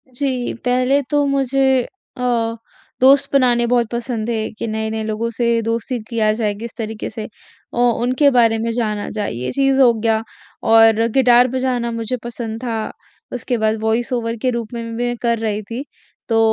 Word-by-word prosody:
जी, 255 -2 -1
पहले 255 +3 +2
तो 290 -1 +2
मुझे 270 -1 +2 0.4
अ, 235 -2 0 0.5
दोस्त 270 +2 +5
बनाने 245 -3 +3
बहुत 240 -2 +3
पसंद 235 -2 -3
थे, 220 -2 -1
कि 225 +1 -5
नए-नए 220 0 -2
लोगों 220 +1 -2
से 235 +1 -2 0.2
दोस्ती 230 +2 -2
किया 220 -2 +2
जाए 210 -2 0
किसी 225 +3 -8
तरीके 220 -2 -4
से 220 0 -6 0.5
औ 240 0 +3
उनके 255 +4 +3
बारे 230 -3 +4
में 230 +1 -1
जाना 215 -3 -2
जाए, 210 -2 -3
ये 125 +2 -4
चीज़ 270 -1 +2
हो 245 -3 +6
गया 225 0 0 0.5
और 225 0 +6 0.2
गिटार 245 -1 +6
बजाना 255 -2 -1
मुझे 230 +2 -3
पसंद 230 -2 -5
था। 225 -3 -3 0.4
उसके 245 0 -2
बाद 220 0 +1
वॉइस 225 +3 0
ओवर 230 -1 -1
के 255 - +1
रूप 235 -1 -4
में 235 -1 -4
भी 230 - -6
मैं 240 0 -1
कर 235 -1 +1
रही 215 -2 -2
थी। 230 +6 -6 0.5
तो 225 -1 +3
235 Hz, 180 wpm, -19 LUFS, 220-250 Hz, 0.5 s, हो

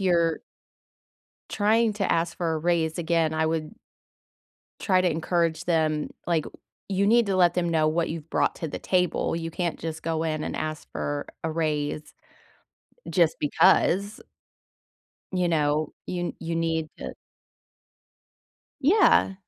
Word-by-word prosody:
you're 170 -3 +2 1.1
trying 220 +2 +2
to 200 -1 -1
ask 165 0 0
for 165 -2 -1
a - - -1
raise, 160 -1 0
again, 165 -2 +1
I 160 0 +1
would 160 +2 -2 1.1
try 185 -2 +3
to 180 -1 +2
encourage 165 0 0
them, 155 -3 0 0.2
like, 165 -3 +1 0.4
you 200 0 +1
need 235 +1 +4
to 195 -1 0
let 175 -2 +4
them 175 -1 0
know 155 -2 +2
what 165 +2 0
you've 160 -1 -6
brought - - +1
to 165 - -4
the - - -5
table; 180 -2 0
you 165 0 -4
can't 170 0 -2
just 160 -1 -5
go 160 -1 -1
in 155 -1 -2
and - - -4
ask 155 -1 -5
for 145 0 -3 0.2
a 160 - 0
raise, 150 -2 -2 0.9
just - - +2
because. 200 +4 +3 1.1
You 180 -1 +1
know? 155 -1 +1
You 175 -1 -3
you 165 +1 -4
need 160 -1 -1
to - - -6 1.7
Yeah. 335 - +4
165 Hz, 140 wpm, -26 LUFS, 155-180 Hz, 1.7 s, need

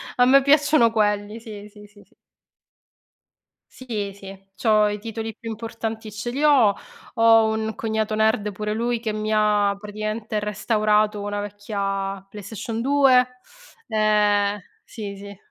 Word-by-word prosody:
a 245 - +4
me 275 +2 +6
piacciono 285 -3 +4
quelli, 210 0 0
sì, 210 -3 -10
sì, 210 0 -15
sì, 205 0 -20
sì. - - -32 1.6
Sì, 215 -6 -5
sì, 195 -1 -10 0.2
c'ho 215 0 +3
i 210 - -3
titoli 225 0 -6
più 230 - -10
importanti 225 0 -6
ce 220 +3 -5
li 270 +4 -3
ho, 265 -9 +5 0.4
ho 225 -1 +5
un 220 0 -3
cognato 220 -1 -2
nerd 215 -1 +1
pure 210 +1 -4
lui, 235 +2 -1
che 220 -2 -3
mi 215 0 -3
ha 210 -2 +2
praticamente 215 +1 -4
restaurato 210 0 +1
una 205 0 -3
vecchia 200 -1 -4
PlayStation 220 +2 -6
2. 265 -1 +4 0.6
Eh, 210 -1 +2 0.2
sì, 205 -4 -7
sì. 200 0 -10
215 Hz, 140 wpm, -23 LUFS, 205-225 Hz, 1.6 s, me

